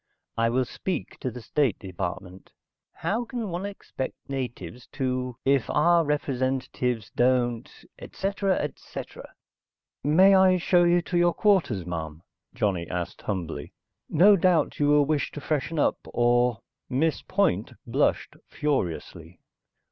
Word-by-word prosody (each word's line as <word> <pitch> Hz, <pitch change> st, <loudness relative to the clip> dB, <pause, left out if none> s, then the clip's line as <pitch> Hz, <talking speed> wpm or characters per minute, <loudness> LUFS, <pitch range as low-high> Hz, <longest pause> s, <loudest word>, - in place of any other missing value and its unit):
"I 115 Hz, 0 st, +2 dB
will 130 Hz, +2 st, +1 dB
speak 185 Hz, +9 st, -5 dB
to 130 Hz, -, -2 dB
the 125 Hz, -1 st, -9 dB
State 135 Hz, -2 st, +1 dB
Department. 95 Hz, 0 st, -6 dB, 0.4 s
How 225 Hz, +4 st, -2 dB
can 235 Hz, -3 st, -5 dB
one 180 Hz, +3 st, -3 dB
expect 195 Hz, -9 st, -6 dB
natives 125 Hz, -5 st, -6 dB
to... 125 Hz, -2 st, -2 dB
if 135 Hz, -2 st, +2 dB
our 170 Hz, +3 st, +4 dB
own 160 Hz, -, -3 dB
representatives 130 Hz, -5 st, -1 dB
don't... 120 Hz, -2 st, +1 dB, 0.3 s
etc., 195 Hz, -1 st, -1 dB
etc." 145 Hz, -, -7 dB, 0.7 s
"May 185 Hz, +7 st, +6 dB
I 190 Hz, -1 st, +5 dB
show 175 Hz, 0 st, +3 dB
you 175 Hz, 0 st, +3 dB
to 175 Hz, 0 st, 0 dB
your 175 Hz, 0 st, +3 dB
quarters, 175 Hz, -, +2 dB
ma'am?" 80 Hz, -2 st, -5 dB, 0.3 s
Johnny 95 Hz, -5 st, -1 dB
asked 90 Hz, -1 st, -4 dB
humbly. 85 Hz, -7 st, -4 dB, 0.4 s
"No 195 Hz, +6 st, +6 dB
doubt 175 Hz, -4 st, +2 dB
you 145 Hz, -, +3 dB
will 145 Hz, 0 st, +5 dB
wish 150 Hz, 0 st, 0 dB
to -, -, -6 dB
freshen 155 Hz, +2 st, -2 dB
up, 145 Hz, -, +2 dB
or...." 120 Hz, -2 st, +2 dB, 0.3 s
Miss 150 Hz, +5 st, 0 dB
Point 185 Hz, -, 0 dB
blushed -, -, 0 dB
furiously. 85 Hz, -, -3 dB
135 Hz, 135 wpm, -26 LUFS, 115-175 Hz, 0.7 s, May